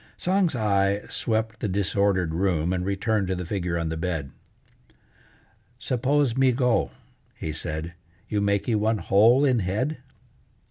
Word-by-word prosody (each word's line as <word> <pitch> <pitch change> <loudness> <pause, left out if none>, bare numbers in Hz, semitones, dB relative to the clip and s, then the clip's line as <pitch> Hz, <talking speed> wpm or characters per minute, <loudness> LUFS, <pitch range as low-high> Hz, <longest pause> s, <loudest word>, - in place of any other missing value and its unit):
Tsang's 185 -4 +1
eye 100 -2 +1
swept 110 -1 -1
the - - -2
disordered 100 -3 +1
room 90 -1 0
and 90 -1 -1
returned 100 +1 0
to 95 - -1
the 90 0 -5
figure 90 -2 -2
on 85 -1 -2
the 80 - -3
bed. 80 -5 -3 1.5
"Suppose 130 +1 0
me 130 -1 +4
go," 125 -1 +1 0.5
he 80 - -5
said, 80 +2 -5 0.3
"you 105 -1 -1
makee 100 +3 +1
one 110 +1 +1
hole 115 +8 +4
in 130 -4 +3
head?" 110 +11 -1
100 Hz, 140 wpm, -25 LUFS, 90-120 Hz, 1.5 s, me